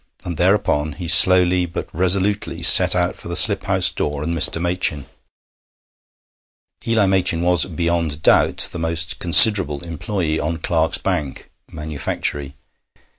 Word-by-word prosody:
And 85 Hz, -, -7 dB
thereupon 85 Hz, -4 st, -2 dB
he 85 Hz, +3 st, -10 dB
slowly 90 Hz, +1 st, +5 dB
but 85 Hz, -, -8 dB
resolutely 95 Hz, +4 st, -2 dB
set -, -, +7 dB
out -, -, -3 dB
for -, -, -12 dB
the -, -, -7 dB
slip -, -, +3 dB
house -, -, 0 dB
door 75 Hz, 0 st, -6 dB
and 85 Hz, +2 st, -5 dB
Mr. 80 Hz, +1 st, +1 dB
Machin. 85 Hz, -4 st, -3 dB, 1.8 s
Eli 115 Hz, -3 st, 0 dB
Machin 95 Hz, -3 st, -1 dB
was 90 Hz, -1 st, +1 dB
beyond 85 Hz, -2 st, -4 dB
doubt -, -, +2 dB
the 85 Hz, -, -9 dB
most 80 Hz, 0 st, -4 dB
considerable 90 Hz, -4 st, +4 dB
employé 85 Hz, -1 st, -5 dB
on 80 Hz, +2 st, -5 dB
Clarke's 80 Hz, -1 st, -2 dB
'bank' 70 Hz, -3 st, -6 dB, 0.2 s
(manufactory). 75 Hz, -2 st, -6 dB
85 Hz, 130 wpm, -17 LUFS, 75-90 Hz, 1.8 s, set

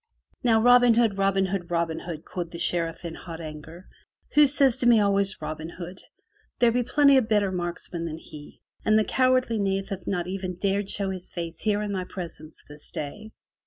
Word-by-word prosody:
"Now, 225 Hz, -2 st, +4 dB
Robin 245 Hz, 0 st, +6 dB
Hood, 225 Hz, -4 st, +2 dB
Robin 195 Hz, 0 st, +2 dB
Hood, 185 Hz, -2 st, -3 dB
Robin 170 Hz, -1 st, -1 dB
Hood," 165 Hz, -3 st, -7 dB
quoth 175 Hz, -2 st, -5 dB
the 170 Hz, -, -8 dB
Sheriff 165 Hz, 0 st, 0 dB
in 165 Hz, -, -5 dB
hot 165 Hz, 0 st, -9 dB
anger. 160 Hz, +3 st, -9 dB, 0.5 s
*'Who 295 Hz, -1 st, +7 dB
says 270 Hz, -3 st, +3 dB
to 240 Hz, -, +1 dB
me 235 Hz, -2 st, +6 dB
always 200 Hz, -1 st, +1 dB
Robin 155 Hz, +1 st, -5 dB
Hood? 180 Hz, +1 st, -8 dB, 0.6 s
There 240 Hz, -1 st, +4 dB
be 245 Hz, +2 st, +1 dB
plenty 280 Hz, +2 st, +4 dB
of 240 Hz, -4 st, +1 dB
better 205 Hz, -3 st, +2 dB
marksmen 175 Hz, -1 st, -4 dB
than 160 Hz, -1 st, -5 dB
he, 150 Hz, -2 st, -13 dB, 0.2 s
and 215 Hz, 0 st, +4 dB
the 215 Hz, -, +4 dB
cowardly 255 Hz, -2 st, +2 dB
knave 195 Hz, 0 st, -1 dB
hath 195 Hz, -3 st, -6 dB
not 180 Hz, -3 st, -1 dB
even 185 Hz, 0 st, -4 dB
dared 200 Hz, +2 st, -1 dB
show 195 Hz, -1 st, 0 dB
his 185 Hz, -1 st, -5 dB
face 170 Hz, -2 st, -6 dB
here 210 Hz, -1 st, 0 dB
in 205 Hz, -, -3 dB
my 185 Hz, -2 st, -2 dB
presence 165 Hz, -4 st, -8 dB
this 150 Hz, 0 st, -12 dB
day! 210 Hz, +9 st, -6 dB
190 Hz, 200 wpm, -26 LUFS, 170-215 Hz, 0.6 s, Who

